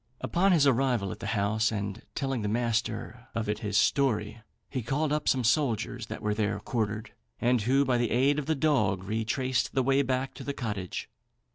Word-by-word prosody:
Upon 190 +3 +2
his 160 -5 +5
arrival 125 -7 +2
at - - -7
the - - -5
house, 110 +2 +1
and 100 0 -3
telling 135 -4 -1
the 105 - -2
master 115 +1 -2
of 115 -2 -1
it 105 0 -1
his 105 -3 -1
story, 110 -3 +1 0.3
he 130 - -3
called 145 +6 0
up 150 - +1
some 130 -2 +2
soldiers 120 -2 0
that - - -7
were 105 0 +1
there 105 -1 -1
quartered, 110 0 -3 0.3
and 125 -1 +2
who, 135 +6 +3
by 125 -2 +2
the 120 -2 +1
aid 140 +4 +3
of 145 - -5
the 160 - +2
dog, 115 -11 +1
retraced 120 +5 -1
the 130 - +3
way 135 +2 +3
back 130 0 -1
to 135 - -9
the 140 - -3
cottage. 105 -8 -4
120 Hz, 200 wpm, -28 LUFS, 105-135 Hz, 0.3 s, his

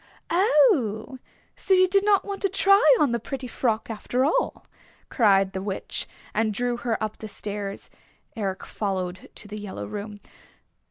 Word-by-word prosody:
"Oh, 295 - +3 0.4
so 385 - +2
you 370 0 +5
did 395 +2 +3 0.2
want 400 -1 -6
to 395 - +2
try 395 +1 +4 0.2
on 285 - +3
the 235 - 0
pretty 265 +3 -6
frock 225 -2 -1
after 245 +3 -1
all," 415 - 0 0.4
cried 195 -4 +3
the 190 - -3
Witch, 195 0 -3 0.3
and 220 0 +1
drew 245 +1 -1
her 235 -2 -1
up 215 -1 -4
the 215 - -6
stairs. 205 -1 -5 0.5
Eric 195 -4 -3
followed 185 -3 -4
to 210 - -8
the 210 +1 -7
yellow 205 -2 -6
room. 210 0 -7
220 Hz, 155 wpm, -25 LUFS, 205-285 Hz, 0.5 s, you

